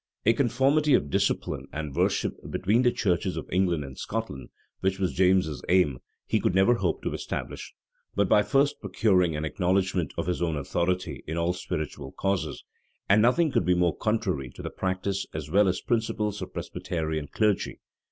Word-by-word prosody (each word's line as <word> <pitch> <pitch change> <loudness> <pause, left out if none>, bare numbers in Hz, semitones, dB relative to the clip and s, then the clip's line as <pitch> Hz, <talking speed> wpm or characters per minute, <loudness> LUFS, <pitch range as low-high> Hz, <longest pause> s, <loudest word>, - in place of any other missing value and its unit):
A 115 - +6
conformity 135 +4 +3
of 70 - 0
discipline - - 0
and 75 -3 -5
worship - - +1 0.2
between 105 +6 +2
the 125 -1 +4
churches 90 -4 0
of - - -5
England 90 -4 +1
and 65 -1 -9
Scotland, 110 -12 -4 0.3
which 95 0 0
was 95 -2 -1
James's 90 -7 +2
aim, 85 -9 +3 0.3
he - - +1
never 95 +6 +3
could 115 - -3
hope 85 -4 0
to - - -2
establish, - - -5 0.4
but 100 -1 +2
by 105 - +5
first 140 +5 +1
procuring 95 -4 +2
an 75 +1 -2
acknowledgment 90 -1 0
of - - -1
his 90 0 -2
own 85 -2 0
authority 85 0 -2
in 80 +2 -3
all 85 +1 +1
spiritual 75 -6 -5
causes; 95 -7 -2 0.4
and 100 +2 +5
nothing 145 +7 +3
could - - +2
be 90 +1 +3
more 90 -1 +2
contrary 100 - -1
to - - -9
the - - -4
practice 95 +1 -2
as 75 -1 -5
well 100 +2 +5
as 95 0 0
principles 105 -3 -1
of - - -5
the - - -34
Presbyterian 80 -3 -3
clergy. 105 +2 0
95 Hz, 180 wpm, -27 LUFS, 80-105 Hz, 0.4 s, A